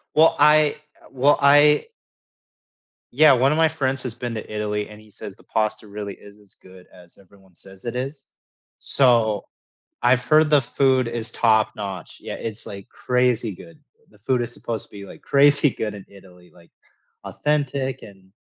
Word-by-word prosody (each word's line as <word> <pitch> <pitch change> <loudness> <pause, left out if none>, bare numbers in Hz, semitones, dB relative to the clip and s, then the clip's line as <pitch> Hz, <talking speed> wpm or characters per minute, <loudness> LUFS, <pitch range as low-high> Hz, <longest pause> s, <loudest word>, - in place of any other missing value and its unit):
Well, 160 +1 +5
I 150 0 +4 0.3
uh, - - -17
well, 135 +2 +2
I 145 +1 +5 1.3
Yeah, 155 0 +7
one 130 +3 +3
of 155 - 0
my 160 - +5
friends 135 -4 -2
has 120 -3 -4
been 120 -1 -5
to 110 -1 -7
Italy, 105 -1 -3
and 105 0 -13
he 110 -1 -19
says 100 0 -10
the - - -22
pasta 110 0 -2
really 100 -1 -7
is 100 +1 -17
as 100 -2 -17
good 95 -1 -18
as 90 0 -18
everyone 95 -1 -23
says 95 +5 -12
it 120 +1 -4
is. 135 +3 -6 0.5
So, 115 -6 +2 0.6
I've 125 0 +3
heard 155 +4 +3
the 150 -2 +4
food 130 -1 +1
is 115 0 -4
top-notch. 105 -5 -1
Yeah, - - -7
it's 115 -1 -6
like 100 -1 -9
crazy 125 -3 0
good. 155 - -15 0.3
The 105 - -23
food 120 +3 -1
is 120 0 -5
supposed 115 -3 -5
to - - -29
be, 100 -1 -10
like, - - -14
crazy 145 0 +4
good 105 -2 -4
in 100 - -11
Italy, 90 -2 -18
like 85 -1 -21 0.5
authentic 140 -3 -2
and 95 -2 -15
115 Hz, 175 wpm, -22 LUFS, 100-135 Hz, 1.3 s, Yeah